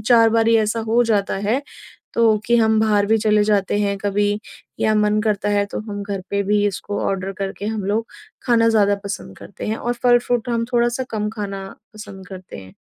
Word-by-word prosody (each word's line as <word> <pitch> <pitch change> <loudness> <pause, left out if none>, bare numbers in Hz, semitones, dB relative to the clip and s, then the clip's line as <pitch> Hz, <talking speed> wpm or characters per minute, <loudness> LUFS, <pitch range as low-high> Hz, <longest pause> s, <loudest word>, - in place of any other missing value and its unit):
4 230 -2 +6
बार 225 0 +2
ही 230 - +5
ऐसा 220 +1 0
हो 235 +2 +4
जाता 205 -4 0
है। 260 +6 +1 0.5
तो 225 -2 +4
कि 235 0 +4
हम 220 -1 +3
बाहर 210 -2 +2
भी 225 +1 +3
चले 210 -1 +3
जाते 205 -1 +1
हैं 200 -1 0
कभी 205 +1 0 0.4
या 215 - +2
मन 210 0 +2
करता 210 -2 0
है 205 0 +2
तो - - -3
हम 205 0 -4
घर 200 -1 -4
पे 200 0 0
भी 205 +1 +1
इसको 205 +1 -3
ऑर्डर 195 0 -2
करके 195 +1 -4
हम 215 -3 -3
लोग 220 +3 0 0.4
खाना 230 -1 +3
ज़्यादा 205 -2 +3
पसंद 200 - -6
करते - - -9
हैं 220 - -1
और 240 +1 -2
फल 240 0 +6
फ्रूट 245 0 -2
हम 230 -1 0
थोड़ा-सा 240 +2 +1
कम 210 -1 -2
खाना 195 -2 -5 0.3
पसंद 205 -3 -10
करते 185 -1 -10
हैं। 95 -1 -13
210 Hz, 210 wpm, -20 LUFS, 200-225 Hz, 0.5 s, 4